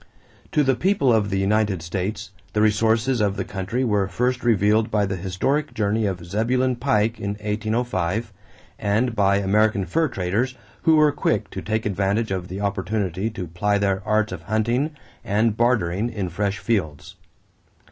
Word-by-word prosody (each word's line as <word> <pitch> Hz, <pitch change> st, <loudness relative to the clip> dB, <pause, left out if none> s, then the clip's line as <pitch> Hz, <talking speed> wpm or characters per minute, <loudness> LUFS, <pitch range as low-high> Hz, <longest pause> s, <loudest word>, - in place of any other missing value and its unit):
To 150 Hz, -, +4 dB
the 135 Hz, -1 st, +3 dB
people 175 Hz, -7 st, +2 dB
of 105 Hz, -2 st, +2 dB
the 95 Hz, -, -1 dB
United 100 Hz, -2 st, +1 dB
States, 95 Hz, +4 st, -4 dB, 0.2 s
the 105 Hz, -, +1 dB
resources 110 Hz, +3 st, +2 dB
of 100 Hz, -2 st, +1 dB
the -, -, -2 dB
country 100 Hz, +7 st, -2 dB
were 105 Hz, -5 st, +1 dB
first 125 Hz, +4 st, -1 dB
revealed 110 Hz, -1 st, +3 dB
by 105 Hz, -1 st, +1 dB
the 95 Hz, 0 st, -2 dB
historic 100 Hz, -, -1 dB
journey 105 Hz, 0 st, +1 dB
of 90 Hz, -3 st, -4 dB
Zebulon 125 Hz, +7 st, 0 dB
Pike 115 Hz, -4 st, +1 dB
in 100 Hz, 0 st, -2 dB
1805 110 Hz, -1 st, -2 dB, 0.5 s
and 110 Hz, +4 st, +1 dB
by 100 Hz, -1 st, +3 dB
American 100 Hz, 0 st, +2 dB
fur 160 Hz, -, +1 dB
traders 115 Hz, +4 st, -1 dB, 0.3 s
who 160 Hz, -, +6 dB
were 155 Hz, -1 st, +5 dB
quick 145 Hz, -, -1 dB
to -, -, -5 dB
take 110 Hz, +1 st, -2 dB
advantage 100 Hz, +2 st, 0 dB
of 90 Hz, -2 st, -2 dB
the 95 Hz, +2 st, -6 dB
opportunity 100 Hz, 0 st, -1 dB
to 100 Hz, -5 st, -6 dB
ply 95 Hz, +5 st, 0 dB
their 100 Hz, -1 st, 0 dB
arts 110 Hz, +1 st, +1 dB
of 90 Hz, -3 st, -6 dB
hunting 120 Hz, -, 0 dB, 0.3 s
and 110 Hz, 0 st, +1 dB
bartering 110 Hz, -3 st, +1 dB
in 100 Hz, -6 st, -3 dB
fresh 100 Hz, +3 st, -1 dB
fields. 85 Hz, -12 st, -2 dB
105 Hz, 165 wpm, -23 LUFS, 95-115 Hz, 0.5 s, who